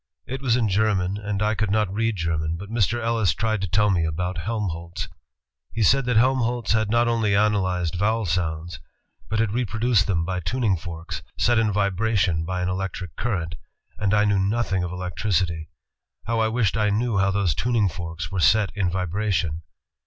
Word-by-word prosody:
It 130 +1 -5
was 125 -4 +2
in 120 -3 +2
German 100 -2 +1
and 105 -1 -2
I 105 +1 +2
could 110 -2 -1
not 105 -2 +1
read 115 +1 0
German, 80 -2 -1
but 100 +4 -9
Mr. 115 +1 +1
Ellis 115 -7 +1
tried 110 -2 0
to 95 - -1
tell 105 +3 +3
me 85 -3 +2
about 85 +3 -2
Helmholtz. 95 -3 -3 0.7
He 110 - 0
said 135 +6 +4
that... 120 -2 +2
Helmholtz 120 -2 +2
had 110 -1 +2
not 120 +2 +3
only 115 -4 +2
analyzed 95 -5 +1
vowel 110 +4 +1
sounds, 85 0 -2 0.5
but 110 - -1
had 110 -1 +1
reproduced 115 -3 +1
them 85 -4 +1
by 90 +1 -2
tuning 105 +3 0
forks... 85 0 -6 0.2
set 120 -1 +3
in 110 -2 +2
vibration 100 -4 +1
by 90 +1 -2
an - - 0
electric 90 -2 -4
current,... 90 -8 -2 0.5
and 100 -2 +1
I 105 0 +4
knew 100 -1 +2
nothing 100 -1 0
of 90 - -3
electricity. 90 -2 -1 0.6
How 115 0 0
I 110 - +3
wished 110 -3 +1
I 105 -2 +2
knew 110 0 +1
how 95 0 +3
those 95 -4 +1
tuning 115 - +1
forks 85 -2 -5
were 95 - -2
set 95 +6 +4
in 95 -4 0
vibration! 90 -2 -1
100 Hz, 185 wpm, -24 LUFS, 90-110 Hz, 0.7 s, said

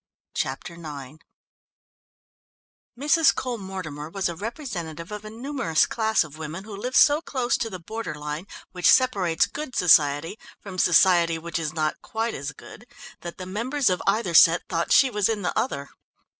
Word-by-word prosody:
Chapter 135 +6 -3
IX 150 -3 -9 1.8
Mrs. 300 +2 +4
Cole 245 -3 -3
Mortimer 170 -6 -7
was 190 +2 -2
a 170 - -4
representative 180 - -6
of 210 0 -6
a 215 - -8
numerous 230 - 0
class 220 -3 +1
of 155 0 -12
women 160 +4 -6
who 210 -1 -9
live 250 +6 -5
so 295 +1 +6
close 255 -6 -1
to 230 - -3
the 185 - -6
border 210 -1 -6
line 150 +4 -6 0.2
which 180 -1 +2
separates 195 -11 +3
good 295 -4 -7
society 150 +2 +3 0.2
from 190 -2 -8
society 175 -2 +4
which 170 +1 -4
is 155 -2 -3
not 155 -1 -2
quite 225 +1 -3
as 140 +1 -5
good, 220 - -14 0.3
that 170 -1 -8
the 185 - -7
members 235 +6 0
of 180 - -1
either 195 -3 +1
set 165 +1 +6
thought 170 -1 -2
she 265 -2 +5
was 210 -2 +1
in 215 -3 -2
the 180 - -2
other. 140 - -2
185 Hz, 170 wpm, -24 LUFS, 160-225 Hz, 1.8 s, so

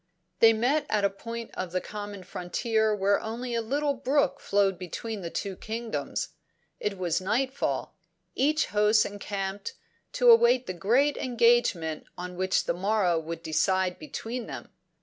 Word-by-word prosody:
"'They 225 - +8
met 265 +7 +1
at 210 -2 +2
a 200 - +2
point 230 +3 -7
of 185 -2 -4
the 185 - 0
common 205 -1 -7
frontier 220 +5 0
where 200 0 +2
only 235 +3 -5
a 230 - +1
little 285 +5 0
brook 275 +2 +1
flowed 195 -2 +1
between 205 +4 -5
the 170 - -4
two 195 +2 -4
kingdoms. 225 +3 -4 0.5
It 205 -1 -2
was 180 -1 0
nightfall; 260 +8 -1 0.4
each 305 +3 +2
host 210 +1 +4
encamped, 200 - -4 0.4
to - - +6
await 460 - +5
the 185 - -4
great 240 +11 +2
engagement 235 -10 +2
which 180 +1 0
on - - -13
the 175 - -10
morrow 195 -5 +2
would 165 +1 -6
decide 180 +3 +1
between 245 -5 -5
them. - - -8
210 Hz, 150 wpm, -28 LUFS, 185-240 Hz, 0.5 s, They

